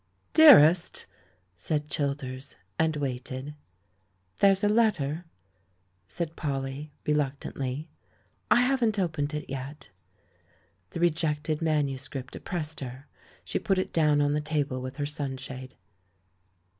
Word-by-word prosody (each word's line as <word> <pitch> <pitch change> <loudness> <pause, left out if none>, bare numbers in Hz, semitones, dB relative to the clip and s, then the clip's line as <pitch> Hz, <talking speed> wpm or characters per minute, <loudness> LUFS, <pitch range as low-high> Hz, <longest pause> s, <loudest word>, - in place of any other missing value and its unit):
"Dearest!" 180 - +7 0.5
said 150 - -2
Childers 140 -2 -3
— 95 - -43
and 160 -1 +2
waited. 130 0 -4 0.9
"There's 195 0 +4
a - - +5
letter," 185 -8 +1 0.8
said 165 - -4
Polly, 140 0 -4
reluctantly; 140 -1 -2 0.6
"I 245 - +6
haven't 250 -4 +2
opened 155 -5 -1
it 150 - -5
yet." 135 +2 -7 1.0
The - - -6
rejected 155 -2 0
manuscript 140 -4 -2
oppressed 160 -4 -4
her; 130 +1 -7 0.4
she - - -1
put 195 -2 +1
it 185 - -2
down 150 -3 +3
on 145 0 +2
the 150 - 0
table 145 -4 -1
with 130 +1 -6
her 145 0 -2
sunshade. 135 -3 -6
150 Hz, 115 wpm, -28 LUFS, 135-165 Hz, 1.0 s, Dearest